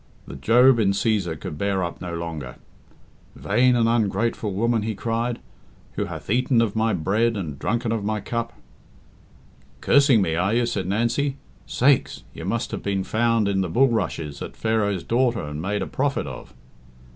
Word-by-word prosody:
The - - -9
Job 120 - +5
in 100 -3 +3
Cæsar 100 -7 0
could 85 -6 -7
bear 100 -2 0
up 85 - -5
no 90 -2 -5
longer. 80 -7 -6 0.8
"Vain 125 +5 +2
and 115 -1 +3
ungrateful 110 -1 0
woman," 115 +3 +1
he 110 0 -3
cried, 115 +3 -2 0.5
"who - - -3
hath - - -8
eaten 125 +1 +2
of 115 -3 +1
my 110 0 +1
bread 105 +7 +1
and 75 -8 -5
drunken 115 +1 -1
of 115 -3 -1
my 105 +1 -1
cup 115 +1 -4 0.7
" - - -29
"Cursing 140 -5 +5
me, 80 - -1
are 95 +6 +1
you?" 120 0 +2
said 100 -6 -2
Nancy. 120 +7 0 0.3
"Sakes! 135 +2 +2
you - - -8
must - - -2
have - - -4
been 100 -1 -1
found 115 0 +1
in 95 -1 +1
the 90 - -2
bulrushes 95 - 0
at - - -7
Pharaoh's 105 -5 0
daughter 120 -3 +1
and 75 +1 -5
made 100 +3 -1
a - - -3
prophet 140 +1 -1
of." - - -9
110 Hz, 175 wpm, -23 LUFS, 95-120 Hz, 0.8 s, Job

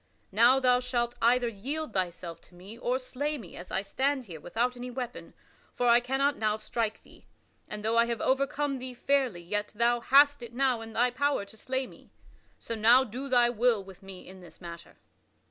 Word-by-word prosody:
Now 240 +6 +5
thou 250 -1 +4
shalt 240 -1 -1
either 240 +1 +3
yield 250 +6 -5
thyself 175 -2 -3
to 175 - -21
me 190 +5 -11
or 245 +1 -1
slay 285 +3 -3
me 200 -10 -11
as 175 - -10
I 190 - -1
stand 265 +5 -1
here 170 -6 -9
without 240 +9 -1
any 250 +1 -7
weapon; 250 -1 -7 0.4
for 245 - 0
I 235 0 +7
cannot 270 +3 0
now 215 -1 +1
strike 220 0 -3
thee, - - -20 0.4
and 210 0 -7
though 225 +1 +1
I 235 - +4
have 235 -2 -2
overcome 275 +1 0
thee 255 0 -7
fairly 260 -8 0
yet 205 +4 -3
thou 240 +2 +2
hast 285 +3 +5
it 235 0 -9
now 255 -3 +1
in 225 0 -9
thy 245 +2 +2
power 285 -4 0
to 200 +2 -14
slay 260 +4 -3
me. - - -16 0.5
So - - -6
now 230 +4 +6
do 260 +4 -6
thy 240 -2 +4
will 235 -3 +2
with 190 0 -14
me 195 -1 -11
in 185 0 -12
this 175 - -15
matter." 170 -1 -10
240 Hz, 200 wpm, -29 LUFS, 210-260 Hz, 0.5 s, I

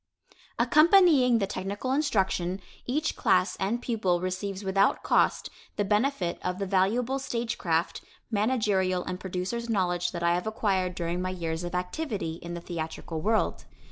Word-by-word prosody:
Accompanying 310 - +5
the 200 - +1
technical 200 +6 -4
instruction, 195 - 0 0.3
each 300 +5 0
class 185 -5 +2
and 205 +5 -1
pupil 195 -7 0
receives 185 +2 -3
without 195 +1 +2
cost - - +2 0.2
the 205 - 0
benefit 210 -4 0
of 180 0 -2
the 200 - -2
valuable 220 +8 +1
stage 235 -3 -3
craft, 165 -2 0 0.3
managerial 205 -5 +1
and 180 - -5
producer's 190 +6 -4
knowledge 180 -4 0
that 170 -2 -5
I 170 0 +3
have 180 +4 -2
acquired 190 -5 0
during 175 0 -2
my 185 - -2
years 165 -2 -3
of 175 0 -4
activity 180 - -3
in 170 0 -6
the 170 - -6
theatrical 160 -1 -5
world. 220 +4 0
190 Hz, 150 wpm, -28 LUFS, 180-230 Hz, 0.3 s, Accompanying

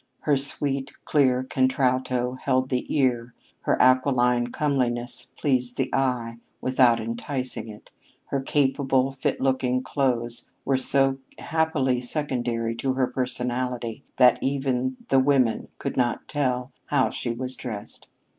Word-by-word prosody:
Her 150 - +2
sweet, 140 0 -1
clear 130 -4 +3
contralto 130 -1 +1
held 130 0 0
the 125 -1 -1
ear; 125 -4 +1 0.2
her - - 0
aquiline 125 -2 +3
comeliness 125 -3 -1
pleased 125 -3 0
the 135 - -1
eye 120 -3 -1 0.2
without 125 -2 +3
enticing 120 +3 -3
it; 105 -1 -12 0.4
her 140 - -1
capable, 135 -1 +1
fit 135 -1 -2
looking 130 -1 +1
clothes 120 -4 -1 0.2
were 135 - +2
so 135 +1 +2 0.2
happily 155 -6 0
secondary 120 -4 -1
to 130 +2 0
her 130 0 +2
personality 125 -2 -2
that 125 -1 +6
even 130 -2 -1
the 135 - +5
women 130 -4 +2
could - - -4
not 120 -2 0
tell 130 -3 -1 0.2
how 140 -3 +2
she 120 - -4
was 125 +2 -4
dressed. 105 -5 -7
130 Hz, 125 wpm, -25 LUFS, 125-135 Hz, 0.4 s, that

